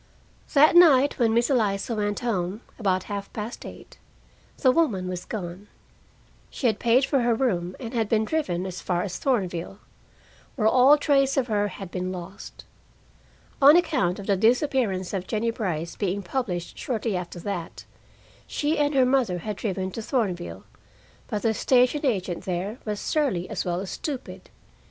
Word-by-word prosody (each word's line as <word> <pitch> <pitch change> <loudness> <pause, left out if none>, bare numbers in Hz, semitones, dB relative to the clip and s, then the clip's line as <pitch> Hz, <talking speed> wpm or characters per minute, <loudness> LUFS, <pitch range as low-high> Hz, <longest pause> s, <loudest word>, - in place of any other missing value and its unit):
That 305 +4 +6
night 290 -6 +6
when 230 -2 +3
Miss 235 +4 +2
Eliza 210 -3 +1
went 205 0 -2
home, 200 -3 -2 0.2
about 185 -4 +1
half 200 -1 -6
past 220 +2 -6
eight, - - -13 0.6
the 260 - +4
woman 230 - +1
was 180 -1 -5
gone. 185 -1 -6 0.8
She - - -6
had 220 -4 +2
paid 245 +3 +3
for 275 - +1
her 240 -1 +2
room 185 -8 -1
and 235 -2 -7
had 225 -3 0
been 220 -1 +2
driven 190 - -1
as 185 -1 -6
far 175 -1 -1
as 190 -3 -5
Thornville, 190 -8 -1 0.8
where 215 -5 +2
all 260 +6 +6
trace 275 -2 +2
of 265 - +2
her 205 -3 0
had 195 -2 -8
been 185 0 -3
lost. 185 +1 -9 1.0
On 285 +3 +9
account 195 - +1
of 200 - -8
the 200 - +2
disappearance 225 - +1
of 190 -2 -3
Jennie 230 +1 0
Brice 170 -7 -3
being 200 0 -2
published 180 -5 -3
shortly 225 -4 -2
after 175 -1 -5
that, 175 -2 -5 0.6
she 300 +2 -1
and 290 0 +1
her 260 -1 +5
mother 250 -8 +1
had 210 +4 -4
driven 190 -2 -3
to 225 - -5
Thornville, 205 -8 -2 0.6
but 210 -3 -3
the 225 -1 +2
station 255 +5 +2
agent 185 -7 -2
there 190 +6 -3
was 210 -2 -3
surly 255 - 0
as - - -3
well 175 0 -1
as 190 0 -5
stupid. 280 -5 -6
215 Hz, 165 wpm, -25 LUFS, 185-255 Hz, 1.0 s, On